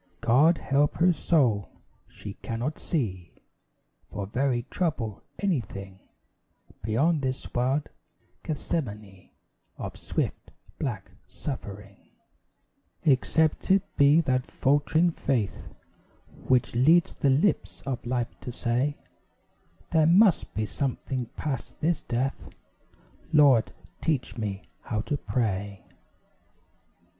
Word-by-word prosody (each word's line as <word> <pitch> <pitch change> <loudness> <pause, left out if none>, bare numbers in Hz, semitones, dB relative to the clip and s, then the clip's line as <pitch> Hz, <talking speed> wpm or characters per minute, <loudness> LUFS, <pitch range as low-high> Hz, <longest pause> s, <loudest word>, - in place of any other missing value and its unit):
God 145 +8 +5
help 140 +1 +1
her 175 +1 +4
soul! 125 -12 +2 0.4
She - - -9
cannot 120 +7 -3
see, 95 - -3 0.8
For 100 -1 -4
very 125 +3 0
trouble, 130 - -2 0.2
anything 100 - -3 0.8
Beyond 140 +10 +2
this 130 -1 -3
wild 130 +4 +1 0.5
Gethsemane 105 - -4 0.5
Of - - -6
swift, - - -3 0.3
black - - -4 0.2
suffering; 100 -7 -8 0.9
Except 155 +3 +2
it 190 0 +5
be 145 +3 +6
that 130 -4 +1
faltering 145 +6 +2
faith 125 -10 -1 0.8
Which 125 -2 +3
leads 160 +8 +5
the 140 - +1
lips 150 +10 +1
of 135 -3 -3
life 120 -1 -2
to 125 - -6
say: 125 +4 0 0.9
"There 160 -2 +4
must 190 +2 +4
be 110 - 0
something 130 +2 -3
past 140 -5 -4
this 165 +2 +1
death 130 +3 -2 0.8
Lord, 140 -7 +5 0.3
teach 150 -6 -1
me 100 -4 -4 0.2
how 110 -2 -2
to 145 - -2
pray!" 100 -7 -2
130 Hz, 100 wpm, -27 LUFS, 115-155 Hz, 0.9 s, be